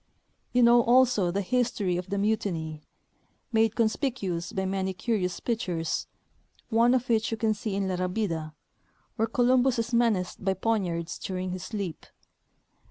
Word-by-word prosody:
You 250 Hz, 0 st, +4 dB
know 240 Hz, 0 st, +7 dB
also 240 Hz, -5 st, +4 dB
the 195 Hz, +3 st, -1 dB
history 230 Hz, -5 st, 0 dB
of 180 Hz, +1 st, -4 dB
the 200 Hz, -, -1 dB
mutiny, 180 Hz, -7 st, -1 dB, 0.7 s
made 225 Hz, -1 st, +2 dB
conspicuous 220 Hz, -, -1 dB
by 190 Hz, 0 st, -2 dB
many 190 Hz, 0 st, -1 dB
curious 190 Hz, -5 st, -1 dB
pic 230 Hz, -2 st, -1 dB
tures, 165 Hz, -7 st, -2 dB, 0.6 s
one 235 Hz, +2 st, +4 dB
of 250 Hz, 0 st, -1 dB
which 225 Hz, -1 st, +2 dB
you 225 Hz, -, -2 dB
can 220 Hz, 0 st, +1 dB
see 210 Hz, -1 st, -4 dB
in 195 Hz, -1 st, -1 dB
La 185 Hz, -1 st, -1 dB
Rabida, 180 Hz, -4 st, -2 dB, 0.7 s
Avhere 225 Hz, 0 st, +1 dB
Columbus 250 Hz, +1 st, +3 dB
is 230 Hz, +1 st, -2 dB
menaced 225 Hz, -8 st, +1 dB
by 190 Hz, 0 st, +1 dB
poignards 180 Hz, -5 st, -1 dB
during 185 Hz, -1 st, -3 dB
his 185 Hz, 0 st, -5 dB
sleep. 200 Hz, -7 st, -5 dB
205 Hz, 155 wpm, -27 LUFS, 185-235 Hz, 0.7 s, know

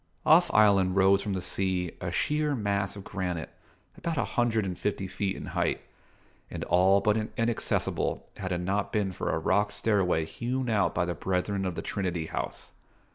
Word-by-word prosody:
Off -, -, +6 dB
Island 100 Hz, -3 st, +4 dB
rose 100 Hz, 0 st, +5 dB
from 105 Hz, -, -3 dB
the 95 Hz, -, -2 dB
sea 90 Hz, -2 st, -1 dB
a 85 Hz, -, -3 dB
sheer 150 Hz, -, 0 dB
mass 100 Hz, -3 st, -1 dB
of 100 Hz, -, -8 dB
granite, 90 Hz, -5 st, -4 dB, 0.4 s
about 165 Hz, -2 st, -3 dB
a -, -, +2 dB
hundred 115 Hz, -3 st, +1 dB
and 90 Hz, -1 st, -3 dB
fifty 100 Hz, -1 st, -2 dB
feet 95 Hz, +1 st, -2 dB
in -, -, -7 dB
height, -, -, 0 dB, 0.7 s
and -, -, -5 dB
all 95 Hz, +2 st, +4 dB
but 105 Hz, +1 st, +1 dB
inaccessible 115 Hz, 0 st, -1 dB
had 95 Hz, -2 st, -4 dB
it 90 Hz, -1 st, -1 dB
not 100 Hz, +3 st, -1 dB
been 100 Hz, -3 st, 0 dB
for -, -, -3 dB
a -, -, +1 dB
rock 105 Hz, 0 st, +1 dB
stair 105 Hz, -3 st, +1 dB
way 80 Hz, -3 st, +1 dB
hewn 125 Hz, +6 st, -3 dB
out 105 Hz, -2 st, +2 dB
by 85 Hz, -, +1 dB
the 85 Hz, -, -2 dB
Brethren 95 Hz, +3 st, -1 dB
of 90 Hz, -, -3 dB
the -, -, -4 dB
Trinity 90 Hz, -5 st, -2 dB
House. -, -, -5 dB
100 Hz, 185 wpm, -28 LUFS, 90-105 Hz, 0.7 s, Off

